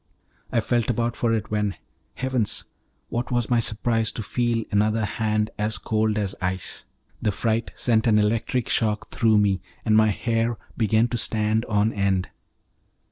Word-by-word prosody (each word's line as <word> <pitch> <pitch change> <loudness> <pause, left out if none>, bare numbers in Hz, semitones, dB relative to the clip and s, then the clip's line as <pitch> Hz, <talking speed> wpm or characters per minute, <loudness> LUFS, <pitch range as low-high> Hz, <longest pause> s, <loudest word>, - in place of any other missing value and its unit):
I 115 - +2
felt 120 0 0
about 120 0 0
for 115 - 0
it, 110 -2 -1
when 105 -2 0 0.4
heavens! 130 -5 0 0.4
what 120 +1 -2
was 120 -1 0
my 120 - +4
surprise 115 0 0
to 110 - -4
feel 120 0 0
another 105 +1 +2
hand 110 0 -1
as 105 +1 +1
cold 110 +1 0
as 100 -2 -1
ice. 95 0 -3 0.4
The 105 - +1
fright 115 +3 -1
sent 115 -1 +2
an 110 -2 +5
electric 110 +3 +1
shock 105 -1 0
through 110 -2 +3
me, 100 -3 +2 0.2
and 110 -2 +3
my 110 0 +6
hair 115 +2 0 0.2
began 110 +1 +3
to 120 - -2
stand 110 +1 0
on 105 +1 +1
end. 95 -2 0
110 Hz, 160 wpm, -24 LUFS, 105-115 Hz, 0.4 s, my